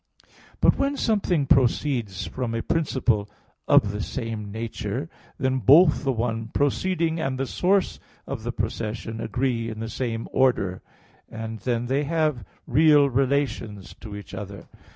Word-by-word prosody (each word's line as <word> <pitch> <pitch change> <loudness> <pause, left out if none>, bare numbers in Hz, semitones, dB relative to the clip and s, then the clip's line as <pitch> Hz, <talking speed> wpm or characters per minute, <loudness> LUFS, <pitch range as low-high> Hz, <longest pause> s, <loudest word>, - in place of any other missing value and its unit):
But - - +4
when 275 +1 +1
something 190 - +1
proceeds 125 -6 +1
from 125 -3 -3
a 115 - -2
principle 125 -10 0 0.4
of 100 - +5
the 105 0 -4
same 110 -3 -4
nature, 115 +5 -4 0.3
then 130 -1 0
both 150 +6 +6
the 135 - +1
one 115 -2 -2
proceeding 165 +6 0
and 135 -4 -1
the 135 - -1
source 190 +7 +1 0.3
of 135 -4 -5 0.2
procession, 110 +1 -3
agree 120 -3 -1
in 110 -1 -7
the 115 0 -4
same 115 -2 -3
order; 100 -8 +1 0.5
and 110 0 -6
then 120 +2 -1
they 135 +4 0
have 155 -6 0 0.2
real 145 0 +5
relations 125 -7 -1
to 105 -3 -8
each 105 - -10
other. 100 -1 -7
125 Hz, 140 wpm, -25 LUFS, 110-145 Hz, 0.5 s, both